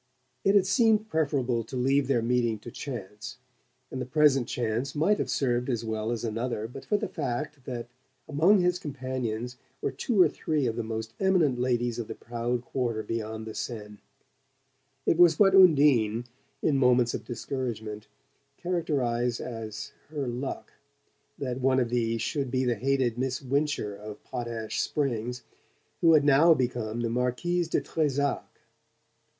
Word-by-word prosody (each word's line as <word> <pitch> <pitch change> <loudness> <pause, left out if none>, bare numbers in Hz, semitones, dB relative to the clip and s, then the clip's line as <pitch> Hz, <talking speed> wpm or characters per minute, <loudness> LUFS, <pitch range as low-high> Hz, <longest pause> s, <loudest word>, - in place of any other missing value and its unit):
It 195 +1 +4
had 195 -2 +5
seemed 220 +1 +3
preferable 135 -7 0
to 130 +4 -6
leave 135 +2 +2
their 125 -4 +2
meeting 120 -2 +1
to 120 - -9
chance 105 -8 -7 0.5
and 130 - -4
the - - -2
present 135 -3 +3
chance 120 +4 -2
might 180 +8 +2
have - - -2
served 125 -1 0
as 120 -2 -1
well 110 0 -2
as 120 -1 -3
another 115 0 -2
but 120 - -10
for 210 - +2
the 215 - -3
fact 145 -2 -4
that 120 -2 -5 0.4
among 165 +7 +4
his 180 0 +1
companions 130 -5 -4 0.2
were - - -1
two 230 -6 -1
or 180 - +8
three 150 -1 -1
of 115 -2 -1
the 120 - -2
most 110 0 -5
eminent 170 -10 +3
ladies 120 -1 0
of 115 - -4
the - - -6
proud 120 +1 -3
quarter 120 -5 -2
beyond 110 -1 -4
the 110 - -7
Seine. 105 -4 -6 1.1
It 165 - +2
was 170 -3 +7
what 195 -2 +5
Undine, 140 - +5 0.4
in 145 -3 +3
moments 125 -2 +4
of - - -4
discouragement, 115 -4 -5 0.5
characterized 125 -9 -1
as 110 -3 -6 0.2
"her 145 -4 -3
luck" 125 +3 -5 0.6
that 130 -2 -3
one 130 0 +3
of 120 -2 0
these 115 -2 0
should 140 0 -1
be 130 +1 0
the 120 - +2
hated 125 0 0
Miss 130 0 -1
Wincher 140 -6 -1
of 105 0 -9
Potash 120 -3 -3
Springs, 125 -4 -2 0.6
who 165 -1 +5
had 150 -2 +6
now 150 +4 +6
become 120 -3 -2
the 115 - -1
Marquise 125 +9 0
de - - 0
Trezac. 145 -2 -1
125 Hz, 160 wpm, -28 LUFS, 115-145 Hz, 1.1 s, or